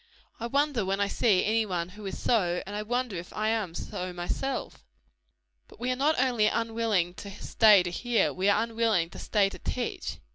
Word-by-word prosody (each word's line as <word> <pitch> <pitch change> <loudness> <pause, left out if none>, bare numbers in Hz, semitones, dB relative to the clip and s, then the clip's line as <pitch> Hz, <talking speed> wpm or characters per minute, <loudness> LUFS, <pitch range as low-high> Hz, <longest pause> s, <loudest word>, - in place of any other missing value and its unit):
I 235 - -3
wonder 280 -2 +1
when 195 +1 -1
I 200 - +2
see 200 -2 +2
any 225 +1 +2
one 180 -4 -3
who 205 +3 -12
is 190 - -5
so; 180 -7 +1
and 200 +2 -6
I 210 - -2
wonder 245 0 -2
if 170 +1 -8
I 215 +1 0
am 215 -7 -1
so 180 0 -5
myself." 245 +10 -4 0.8
But - - -17
we 250 +2 -1
are - - 0
not 290 +3 +2
only 245 -5 +3
unwilling 225 -6 0
to 200 - -9
stay 205 0 +4
to 175 - -4
hear 240 +4 +1
we 190 +2 +1
are 205 +2 +3
unwilling 225 -7 0
to - - -10
stay 205 -2 +2
to - - -10
teach. 245 - -4
215 Hz, 205 wpm, -28 LUFS, 190-235 Hz, 0.8 s, stay